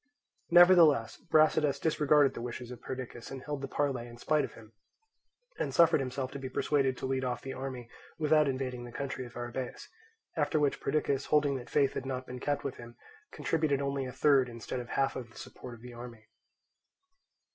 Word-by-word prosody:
Nevertheless 170 -8 +6
Brasidas 155 -2 +3
disregarded 150 -3 +3
the - - -6
wishes 120 0 -6
of 120 -1 -9
Perdiccas 125 -2 -7
and 135 -1 -7
held 145 -2 -4
the 135 - -3
parley 135 -4 -1
in 120 0 -12
spite 150 +5 +1
of - - -6
him, 115 -1 -15 0.9
and - - -1
suffered 165 -2 +6
himself 130 0 -3
to 140 - -6
be 130 -1 -5
persuaded 135 -3 +1
to - - -5
lead 130 0 -1
off 125 -1 -2
the 135 - -5
army 130 -2 -6 0.3
without 155 -1 +3
invading 130 -2 -3
the 120 - -9
country 130 -1 -4
of 120 - -12
Arrhabaeus; 120 +1 -5 0.5
after 155 -1 +1
which 145 -2 +1
Perdiccas, 140 -3 0
holding 145 -2 +3
that 120 -2 -9
faith 140 -2 +2
had 130 - -4
not 130 -1 -3
been 125 0 -7
kept 145 +2 -1
with 140 - -4
him, 120 0 -11 0.4
contributed 155 -4 0
only 140 -1 -2
a - - -6
third 135 -2 +3
instead 115 +2 -5
of 120 -1 -7
half 135 0 0
of 120 -3 -6
the 115 - -17
support 125 -2 -9
of 115 - -17
the 125 -1 -9
army. 120 -2 -10
135 Hz, 195 wpm, -31 LUFS, 125-145 Hz, 0.9 s, Nevertheless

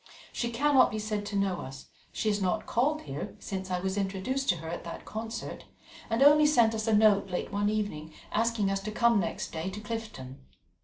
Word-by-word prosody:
She 235 - -1
cannot 270 +2 +4
be 215 - -4
said 210 -1 -3
to 205 - -4
know 195 -3 0
us; 135 +1 -9 0.3
she - - -3
has 205 -1 0
not 190 +3 0
called 295 +6 +1
here 140 +1 -6
since 190 -1 -5
I 180 -1 0
was 190 +2 -2
introduced 200 +8 -2
to 180 - +4
her 165 -1 -8
at 170 +1 -5
that 170 - -8
concert, 225 +1 -6 0.4
and 230 +4 +3
only 295 +1 +7
sent 235 -7 +4
us 220 0 -3
a 225 - +3
note 210 -2 +4
late 180 - -3
one 205 +1 +1
evening 205 -8 -3 0.2
asking 225 -2 +1
us 195 - 0
to 210 +2 -5
come 235 0 +3
next 185 - -3
day 165 +3 -3
to 195 +2 -7
Clifton. 215 - -6
210 Hz, 210 wpm, -29 LUFS, 190-230 Hz, 0.4 s, only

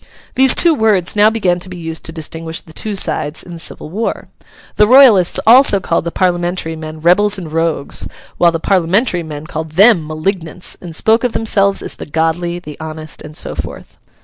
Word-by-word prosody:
These 265 0 +4
two 340 -2 +4
words 215 - +1
now 210 +1 +5
began 190 -6 0
to 185 - -7
be 185 - -8
used 165 -1 -6
to - - -4
distinguish 160 0 -5
the 160 - -15
two 210 +5 -4
sides 155 -4 0
in 175 - -11
the 170 - -9
civil 155 -1 -8
war. 220 +5 -4 0.5
The 210 - +5
Royalists 240 -8 +6
also 235 -3 +6
called 170 -2 -1
the 170 - -3
Parliamentary 175 -2 -1
men 155 0 -8
Rebels 200 +5 +3
and 165 -5 -8
Rogues, 165 -3 -1 0.3
while 170 -1 +5
the 165 - -3
Parliamentary 185 +3 +1
men 155 -2 -8
called 160 -1 -6
them 190 -3 +4
Malignants, 165 +2 -4
and 170 -3 -8
spoke 220 +7 +2
of 245 -2 -1
themselves 200 -3 +1
as - - -7
the - - -8
Godly, 165 +3 -1
the 150 -4 -10
Honest, 155 0 -7
and 150 +1 -10
so - - -3
forth. - - -8
175 Hz, 195 wpm, -15 LUFS, 160-205 Hz, 0.5 s, Royalists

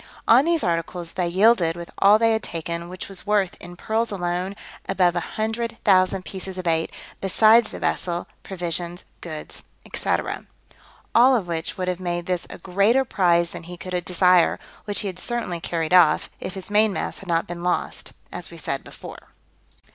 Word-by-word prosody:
On 250 +5 +6
these 335 -1 +2
articles 170 0 -2
they 180 -1 -1
yielded 185 -2 +4
with 170 0 -8
all 205 +2 +7
they 225 0 +3
had 220 - 0
taken, 170 0 -4
which 185 0 -7
was 195 +1 -3
worth, 205 -3 +2
in 175 0 -10
pearls 220 +6 -1
alone, 180 0 -2 0.3
above 180 -2 +3
100,000 205 -1 +1
pieces 190 -1 -6
of 185 - -5
eight, 165 -1 +1 0.3
besides 220 +4 +5
the - - -7
vessel, 175 -1 -1 0.2
provisions, 175 -1 -4 0.2
goods, 155 -3 -8 0.3
&c. - - -4 1.0
All 255 +3 +6
of 200 -7 -1
which 165 -1 -3
would 185 -1 -2
have 180 -1 -1
made 175 -1 -3
this 180 -1 -2
a - - -8
greater 200 +9 +2
prize 170 -6 +2
than - - -7
he 175 +1 -9
could 180 0 -4
desire, 180 -1 +3 0.3
which 205 -1 0
he 205 - -3
had 185 -2 -6
certainly 235 -8 -2
carried 165 0 -2
off, 170 -4 +5
if 185 - -6
his 190 +1 -6
main 210 +1 +4
mast - - -4
had 195 - -11
not 165 -1 +1
been 175 0 -7
lost, 180 0 -2 0.2
as - - -7
we - - -11
said - - -3
before. - - -11
180 Hz, 175 wpm, -23 LUFS, 175-205 Hz, 1.0 s, all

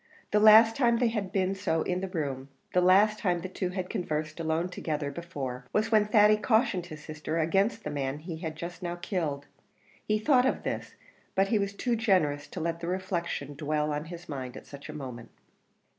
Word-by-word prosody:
The 210 - +4
last 220 +1 +8
time 235 -3 +3
they 240 -1 +2
had 210 -5 -3
been 190 0 +1
so 185 -5 0
in 180 0 -1
that 190 -1 -5
room 140 -4 -3 0.2
the 180 - +4
last 205 +4 +5
time 175 -3 0
the 185 - -4
two 185 0 -3
had 180 0 -4
conversed 155 -3 -3
alone 160 +1 0
together 150 -5 -3
before, 135 -6 -6
was 215 +2 +1
when 215 -2 +5
Thady 210 0 +6
cautioned 220 -5 +1
his 155 -3 -10
sister 155 +1 -4
against 195 +8 +1
the 150 - -4
man 140 -1 -2
he 160 +2 -7
just 170 +3 -7
now 175 -1 -3
killed; 170 -6 -3 0.6
he 215 - +2
thought 250 +3 +4
of - - -1
this, - - -4 0.4
but 195 0 +3
he 215 - +3
was 200 0 -1
too 240 +4 0
generous 180 -10 +1
to - - -7
let 170 +1 -2
the 170 - -5
reflection 175 -6 -3
dwell 150 +1 -1
on 150 +1 -3
his 175 +1 -9
mind 130 -4 -6
at - - -11
such 140 +1 -11
a - - -3
moment. 130 -5 -7
175 Hz, 205 wpm, -29 LUFS, 150-205 Hz, 0.6 s, last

